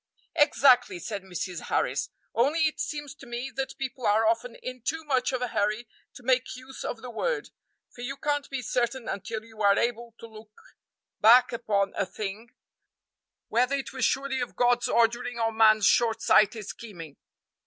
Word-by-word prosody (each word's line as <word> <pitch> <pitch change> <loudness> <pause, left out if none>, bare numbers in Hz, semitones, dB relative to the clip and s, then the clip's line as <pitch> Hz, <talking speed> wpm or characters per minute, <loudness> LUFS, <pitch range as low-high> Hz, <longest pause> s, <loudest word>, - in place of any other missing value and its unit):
"Exactly," 265 - +4
said 200 +4 -5
Mrs. 180 -1 -5
Harris, - - 0 0.2
"only 285 +8 +2
it 310 - -1
seems 295 -2 -4
to 275 -4 -15
me 240 +3 -5
that 270 0 -4
people 260 -2 -3
are 215 +2 +3
often 230 +1 0
in 255 -1 -7
too 320 +7 -3
much 270 -4 +1
of 255 -1 -2
a 250 - -2
hurry 215 +3 -1 0.3
to 250 - -12
make 255 +1 +1
use 260 +1 -10
of 225 - -5
the 250 - -7
word, - - -2 0.4
for 240 - -11
you 275 +3 -4
can't 290 0 -1
he 270 -2 -4
certain 240 +1 -1
until 215 +2 -4
you 220 -1 -12
are 200 -1 +5
able 235 -1 -2
to - - -9
look 215 -1 -14 0.6
hack 245 +3 +7
upon 205 -4 0
a 195 - -1
thing 215 +4 -6 1.0
whether 250 +4 +2
it 275 0 -5
was 260 -2 -3
surely 270 +1 +1
of 245 - -5
God's 245 0 +2
ordering 235 +1 +1
or 225 -1 +1
man's 215 -2 +5
short 225 0 +3
sighted 215 +1 +4
scheming. 175 -12 -9
240 Hz, 175 wpm, -27 LUFS, 220-260 Hz, 1.0 s, hack